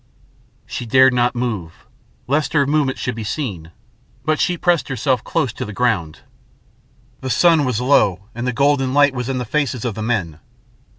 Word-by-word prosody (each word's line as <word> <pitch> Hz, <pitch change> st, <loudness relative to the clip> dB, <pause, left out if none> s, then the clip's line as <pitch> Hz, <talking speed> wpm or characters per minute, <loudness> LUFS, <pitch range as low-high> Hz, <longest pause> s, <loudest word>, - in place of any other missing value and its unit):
She 120 Hz, -, -6 dB
dared 130 Hz, +2 st, +5 dB
not 125 Hz, 0 st, +1 dB
move 105 Hz, -9 st, -4 dB, 0.4 s
lest 145 Hz, +3 st, 0 dB
her 145 Hz, -3 st, +3 dB
movement 145 Hz, -2 st, +1 dB
should 125 Hz, -, -3 dB
be 115 Hz, -1 st, -6 dB
seen, 105 Hz, -, -4 dB, 0.6 s
but 155 Hz, 0 st, +1 dB
she 180 Hz, -, +1 dB
pressed 175 Hz, -1 st, +1 dB
herself 130 Hz, -1 st, 0 dB
close 125 Hz, -4 st, -1 dB
to 130 Hz, -, -5 dB
the 105 Hz, -4 st, -7 dB
ground. 100 Hz, -11 st, 0 dB, 1.0 s
The 130 Hz, -, -5 dB
sun 165 Hz, +1 st, +4 dB
was 125 Hz, -4 st, -1 dB
low 110 Hz, -8 st, +2 dB
and 120 Hz, +2 st, -4 dB
the -, -, +1 dB
golden 140 Hz, 0 st, +1 dB
light 145 Hz, -1 st, +5 dB
was 125 Hz, 0 st, -4 dB
in 135 Hz, -, -1 dB
the 125 Hz, -, -3 dB
faces 130 Hz, -2 st, -1 dB
of 120 Hz, -, -1 dB
the 110 Hz, -, -6 dB
men. 100 Hz, -9 st, -2 dB
125 Hz, 180 wpm, -19 LUFS, 115-140 Hz, 1.0 s, dared